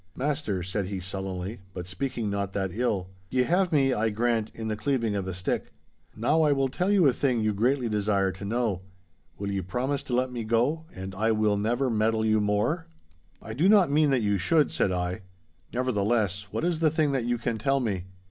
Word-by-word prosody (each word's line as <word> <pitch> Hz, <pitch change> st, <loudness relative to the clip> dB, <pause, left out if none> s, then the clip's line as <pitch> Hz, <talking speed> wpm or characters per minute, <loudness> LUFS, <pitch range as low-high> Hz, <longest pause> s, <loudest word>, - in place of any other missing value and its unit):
'Master,' 135 Hz, -, -1 dB
said 95 Hz, +1 st, -2 dB
he, 95 Hz, -1 st, -4 dB
sullenly, 95 Hz, +3 st, -5 dB, 0.2 s
but 90 Hz, -2 st, -5 dB
speaking 120 Hz, +5 st, -3 dB
not 100 Hz, -1 st, -2 dB
that 95 Hz, -2 st, -1 dB
ill, 100 Hz, -6 st, -1 dB, 0.2 s
'ye 125 Hz, +3 st, +2 dB
have 180 Hz, +5 st, +2 dB
me, 135 Hz, -4 st, +3 dB
I 110 Hz, -1 st, +1 dB
grant, 115 Hz, 0 st, 0 dB
in 110 Hz, -1 st, -5 dB
the 110 Hz, -, -1 dB
cleaving 115 Hz, -3 st, 0 dB
of 95 Hz, -2 st, -2 dB
a 95 Hz, -, -3 dB
stick. 90 Hz, 0 st, -2 dB, 0.4 s
Now 125 Hz, +9 st, +2 dB
I 150 Hz, -2 st, +4 dB
will 135 Hz, -1 st, +1 dB
tell 180 Hz, +8 st, -1 dB
you 200 Hz, -4 st, +4 dB
a 135 Hz, -, +5 dB
thing 125 Hz, -4 st, +1 dB
you 110 Hz, -1 st, +1 dB
greatly 125 Hz, +5 st, +1 dB
desire 100 Hz, -2 st, +1 dB
to 95 Hz, +2 st, -10 dB
know. 110 Hz, -3 st, -1 dB, 0.6 s
Will 100 Hz, 0 st, -3 dB
ye 100 Hz, -1 st, -1 dB
promise 130 Hz, +9 st, -2 dB
to 130 Hz, -3 st, -3 dB
let 130 Hz, +1 st, +1 dB
me 120 Hz, -2 st, -4 dB
go, 120 Hz, +9 st, +1 dB
and 95 Hz, +1 st, -7 dB
I 110 Hz, +4 st, +1 dB
will 110 Hz, -1 st, +2 dB
never 120 Hz, +6 st, 0 dB
meddle 110 Hz, 0 st, +1 dB
you 110 Hz, -1 st, +3 dB
more?' 105 Hz, +12 st, 0 dB, 0.6 s
'I 110 Hz, -, -6 dB
do 160 Hz, -, +3 dB
not 200 Hz, -8 st, +5 dB
mean 150 Hz, 0 st, +4 dB
that 130 Hz, -4 st, +2 dB
you 100 Hz, -1 st, +1 dB
should,' 155 Hz, -, +3 dB
said 95 Hz, -, +1 dB
I, 90 Hz, 0 st, -2 dB, 0.5 s
'nevertheless, 105 Hz, -5 st, 0 dB
what 155 Hz, -, -2 dB
is 175 Hz, -2 st, 0 dB
the 160 Hz, -1 st, +4 dB
thing 155 Hz, -1 st, +1 dB
that 130 Hz, -4 st, 0 dB
you 120 Hz, 0 st, 0 dB
can 115 Hz, -1 st, -2 dB
tell 135 Hz, +4 st, +2 dB
me? 100 Hz, -8 st, -2 dB
115 Hz, 215 wpm, -27 LUFS, 100-135 Hz, 0.6 s, a